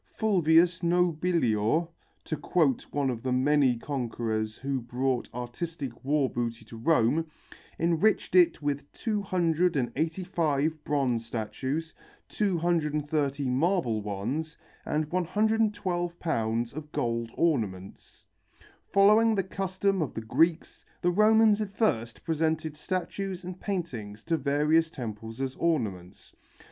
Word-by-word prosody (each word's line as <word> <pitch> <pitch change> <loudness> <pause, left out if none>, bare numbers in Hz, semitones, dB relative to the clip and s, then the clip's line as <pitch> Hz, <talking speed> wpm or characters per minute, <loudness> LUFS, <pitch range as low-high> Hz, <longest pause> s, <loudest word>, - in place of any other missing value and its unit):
Fulvius 175 -4 +4
Nobilior, 170 - +2 0.4
to 155 - -3
quote 155 -6 +1
one 140 -2 0
of 115 -2 -5
the 130 - -2
many 130 -1 +3
conquerors 115 -5 -3
who 135 -1 -2
brought 125 +1 -1
artistic 125 +2 -6
war 140 0 +2
booty 115 -2 -4
to 115 - -11
Rome, 155 +3 +2 0.5
enriched 170 +6 +1
it 180 -4 +4
with 145 0 -2
285 165 - 0
bronze 130 -6 0
statues, 130 +8 -4 0.4
230 150 -6 0
marble 135 - +1
ones, 115 +11 -4 0.3
and 155 +1 0
112 185 -2 0
pounds 115 -6 -1
of 150 +1 -8
gold 115 -1 -1
ornaments. 105 - -2 0.6
Following 215 +3 +5
the 195 - +1
custom 190 0 -1
of 145 - -3
the 115 - -3
Greeks, 160 +9 +1 0.2
the 175 - +3
Romans 215 +2 +5
at 210 - -2
first 120 - -1
presented 160 -1 -1
statues 185 +3 -4
and 180 +1 -7
paintings 120 - -4
to 165 - 0
various 150 +3 +2
temples 115 -4 -7
as 135 -1 -2
ornaments. 100 - -2
155 Hz, 110 wpm, -28 LUFS, 120-175 Hz, 0.6 s, Following